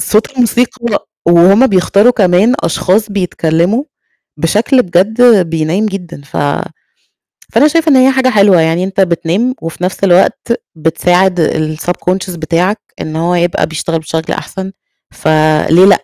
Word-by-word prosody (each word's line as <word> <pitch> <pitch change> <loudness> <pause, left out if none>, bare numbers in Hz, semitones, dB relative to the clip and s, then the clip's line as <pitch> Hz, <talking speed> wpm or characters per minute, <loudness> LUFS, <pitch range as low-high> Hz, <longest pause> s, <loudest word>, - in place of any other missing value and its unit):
صوت 215 +1 0
الموسيقى، 245 -2 -1 0.2
وهُم 180 +8 +5
بيختاروا 200 +3 +2
كمان 200 +3 +2
أشخاص 200 +5 0
بيتكلموا 180 - -1 0.5
بشكل 230 - +1
بجد 200 +3 +3
بينيِّم 165 +6 -1
جدًا، 180 -7 -7
ف 135 - -11 1.2
فأنا 300 - +4
شايفة 325 +1 +1
إن 275 - +5
هي 260 +1 +5
حاجة 260 -1 +1
حلوة، 200 -6 +4
يعني 165 +3 0
أنت 195 +1 -3
بتنام، 185 +7 0
وفي 165 +2 -6
نفس 185 +2 -3
الوقت 185 +5 +2 0.2
بتساعد 180 +3 +1 0.4
الSubconscious 180 +2 -3
بتاعك 175 +6 -1 0.2
إن 155 0 -5
هو 170 +2 -1
يبقى 175 0 0
بيشتغل 160 +1 -3
بشكل 160 +1 -4
أحسن، 190 0 -6 0.4
فليه 155 +2 +2
لأ؟ 195 - +5
185 Hz, 130 wpm, -12 LUFS, 170-220 Hz, 1.2 s, وهُم